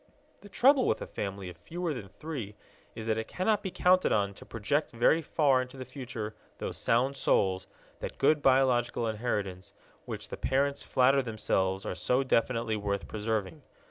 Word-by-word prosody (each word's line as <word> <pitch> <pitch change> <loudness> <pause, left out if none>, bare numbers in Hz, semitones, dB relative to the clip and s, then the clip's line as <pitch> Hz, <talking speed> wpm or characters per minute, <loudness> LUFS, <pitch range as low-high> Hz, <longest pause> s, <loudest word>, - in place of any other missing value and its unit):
The 205 - -14
trouble 265 +4 +4
with - - +1
a - - -5
family 100 -1 -5
of 90 -2 -9
fewer 170 - -4
than 105 -8 -7
three 120 -5 -6 0.4
is 110 -1 -6
that 110 -1 +1
it 110 - -4
cannot 205 +3 +1
be 190 - -3
counted 185 +1 +3
on 100 -2 +1
to - - -13
project 115 +8 -1
very 125 +7 +3
far 140 -4 +3
into 130 +1 -8
the 130 - -6
future 120 -6 -6 0.2
those - - -4
sound 130 +4 +2
souls, 95 -7 +1 0.3
that - - -6
good 145 +2 +3
biological 130 -3 +3
inheritance, 105 -5 -3 0.3
which - - -6
the - - -6
parents 140 +2 0
flatter 135 +2 +3
themselves 100 -5 -1
are - - -2
so 125 +2 +1
definitely 115 -3 +1
worth 100 -1 -2
preserving. 105 -4 -3
120 Hz, 175 wpm, -30 LUFS, 105-140 Hz, 0.4 s, trouble